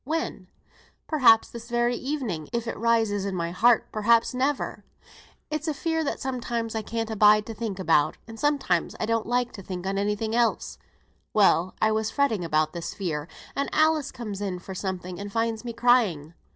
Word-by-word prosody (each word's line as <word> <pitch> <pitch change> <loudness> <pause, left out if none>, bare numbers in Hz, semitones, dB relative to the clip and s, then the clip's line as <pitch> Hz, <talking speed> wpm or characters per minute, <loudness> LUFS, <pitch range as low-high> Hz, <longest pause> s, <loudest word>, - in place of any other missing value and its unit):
"When?" 310 - -3 0.6
"Perhaps 250 -8 +5
this 235 0 -10
very 240 0 +1
evening, 245 - -3
if 235 -1 -2
it 230 - -3
rises 225 -3 +1
in 195 -1 -3
my 170 -1 -2
heart; 235 +6 +4
perhaps 230 +3 +3
never. 265 +3 -1 0.7
It's 305 +1 -2
a 310 - -1
fear 320 +2 -1
that 285 - -2
sometimes 240 -3 -3
I 220 - -2
can't 225 +1 -3
abide 210 0 +5
to 225 - -6
think 220 -3 -4
about, 165 -5 +2
and 225 0 -10
sometimes 290 -2 +1
I - - 0
don't 230 0 0
like 245 0 0
to 195 - -9
think 180 -1 -6
on 195 +1 -1
any 205 +1 +1
thing 220 +1 -3
else. 235 -1 0 0.6
Well, 185 -3 +4
I 220 - +3
was 220 0 0
fretting 240 -10 +1
about 155 -1 +1
this 170 -1 -5
fear, 160 -6 -3 0.3
and 280 - -1
Alice 310 -2 +2
comes 210 -5 -6
in 190 -3 -2
for 190 +2 -8
something, 185 -2 -4
and 200 0 -6
finds 225 +1 -1
me 240 - -4
crying. 220 -11 +2
225 Hz, 190 wpm, -26 LUFS, 195-245 Hz, 0.7 s, Perhaps